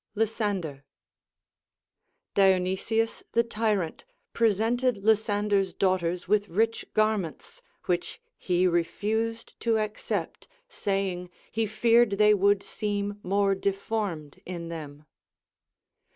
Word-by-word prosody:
Lysander. 205 -10 -1 1.5
Dionysius 195 +4 +2
the 235 - +4
Tyrant 215 -7 -1 0.3
presented 230 +2 +2
Lysander's 205 -2 +2
daughters 180 -2 0
with 205 +1 +2
rich 225 +6 0
garments, 215 - -1 0.2
which 175 -1 -2 0.2
he 180 0 +1
refused 220 +6 -1
to 230 -1 +2
accept, 215 -1 -3 0.2
saying 195 - -2 0.2
he 225 0 0
feared 230 +1 +4
they 210 +1 +5
would 200 0 +3
seem 205 -1 -3
more 195 +1 +2
deformed 195 -5 -3
in 170 -2 -6
them. 150 -2 -8
205 Hz, 95 wpm, -27 LUFS, 185-220 Hz, 1.5 s, they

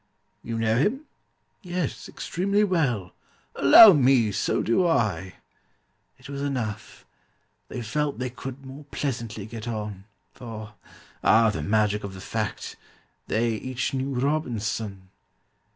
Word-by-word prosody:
You 115 -1 -4
know 110 0 +1
him?" 230 - +1 0.6
"Yes, 180 - -4
extremely 200 +4 0
well." 135 - 0 0.4
"Allow 200 +9 +9
me, 130 -6 +4
so - - 0
do 175 +11 +2
I." 105 - 0 0.8
It - - -14
was 140 0 -5
enough: 125 -7 -4 0.6
they 125 - -6
felt 150 +6 -2
they 125 0 -3
could 135 +2 -8
more 135 +3 -10
pleasantly 115 -7 -4
get 110 +1 -8
on, 105 -4 -5 0.3
For 110 -4 -9 0.5
(ah, 110 0 +5
the 80 - -4
magic 105 +3 +1
of 100 -1 -6
the - - -9
fact!) 105 +1 -4 0.5
they 115 +1 +1
each 130 +4 -3
knew 135 +1 -2
ROBINSON! 115 -8 -2
120 Hz, 125 wpm, -25 LUFS, 110-140 Hz, 0.8 s, Allow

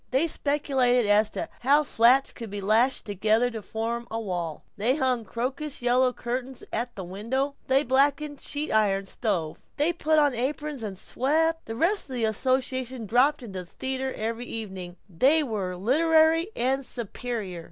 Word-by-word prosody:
They 265 +5 +2
speculated 265 -6 +1
as 210 +1 +4
to - - -4
how 285 +4 +4
flats 255 +1 +4
could 230 -2 -8
be 205 +1 -5
lashed 220 +6 +2
together 220 +4 +1
to 225 -2 -6
form 230 +4 -4
a 225 - -3
wall; 175 -7 -4
they 230 +5 +1
hung 255 -5 0
crocus 260 +5 -4
yellow 250 +1 +3
curtains 250 +1 -5
at 240 +2 -2
the 190 - -5
windows; 230 +10 -2 0.2
they 270 +2 +3
blacked 275 +2 +3
the 300 -1 -7
sheet 295 +1 -3
iron 200 -3 +2
stove; 190 -7 -2 0.2
they 305 +4 +2
put 315 -2 +1
on 290 -3 +4
aprons 275 +3 -3
and 200 -4 -5
swept. 320 - 0
The 225 - -4
rest 345 - +1
of 260 - -5
the 235 -2 +1
association 255 +1 -1
dropped 255 +7 +3
into 195 -5 -6
the 180 - -7
theater 265 +5 -3
every 230 +2 -3
evening, 190 -5 -6 0.2
and 295 +2 +5
were 195 -5 -3
literary 320 - +3
and 265 +3 0
superior. 230 -6 -5
245 Hz, 170 wpm, -26 LUFS, 220-275 Hz, 0.2 s, and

